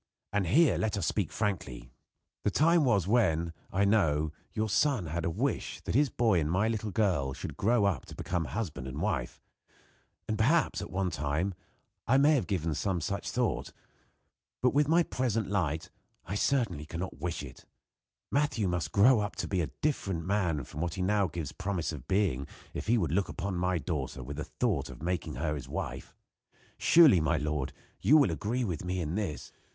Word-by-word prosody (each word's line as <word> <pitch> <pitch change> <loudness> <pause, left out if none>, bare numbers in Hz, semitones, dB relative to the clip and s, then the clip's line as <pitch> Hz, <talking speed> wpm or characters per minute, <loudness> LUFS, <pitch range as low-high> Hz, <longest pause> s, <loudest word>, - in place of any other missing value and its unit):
And 100 -3 +1
here 130 - +4
let 105 +2 0
us 100 - -1
speak 100 -6 0
frankly. 70 - -3 0.5
The - - +2
time 165 +6 +4
was 100 -8 +2
when, 85 -8 +2 0.2
I 100 +2 +2
know, 80 -8 +2 0.2
your 110 0 -1
son 115 - +2
had 80 +2 -3
a - - +1
wish 80 - -2
that - - -4
his 140 +4 +4
boy 110 -8 +2
and 75 -1 -1
my 95 +6 +2
little 110 -1 -2
girl 90 -11 +1
should - - -6
grow 110 0 +2
up 100 -3 0
to - - -10
become 90 -3 -2
husband 80 - -4
and 65 - -5
wife. - - -2 1.0
Perhaps, 140 +10 +2
at - - -6
one 95 -1 -1
time, 80 +6 -1 0.5
I 130 - +5
may 145 +3 +5
have 135 -7 0
had 80 -5 -1
some 95 0 -1
such 100 +5 -3
thought; 125 -2 -1 0.9
but, 125 - +4
with 145 +1 +3
my 170 +3 +4
present 115 - -1
light, 80 -5 -1 0.3
I 95 - -5
certainly 105 - 0
cannot 85 -3 -5
wish 85 -1 -3
it. 65 -4 -11 0.7
Matthew 140 -7 +1
must 85 -4 -1
grow 115 +4 +6
up 105 +1 -2
to - - -3
be 95 -3 0
a 80 - -2
different 95 - -1
man 90 -7 0
from 75 +5 -7
what 85 -1 -2
he 90 - -2
now 100 0 +2
gives 80 -3 -5
promise 90 -2 -2
of 75 -6 -8
being 90 -10 +1 0.3
if - - -5
he 120 +2 +4
would 85 -9 0
look 95 +4 +1
upon 95 +2 -3
my 90 +1 +1
daughter 70 -6 -3
with 70 +4 -7
the 75 - -3
thought 90 - -1
of 65 +3 -10
making 85 -3 -2
her 75 -3 -1
his 70 -4 -6
wife. - - -5 0.6
Surely, 150 - +7
my 80 +1 +2
lord, 75 -3 -2 0.3
you 140 +11 +6
will 140 - +4
agree 110 +10 -1
with 90 -8 -3
me, 90 +1 -2
in 80 -2 -2
this?" 95 -7 -3
95 Hz, 190 wpm, -30 LUFS, 80-110 Hz, 1.0 s, Surely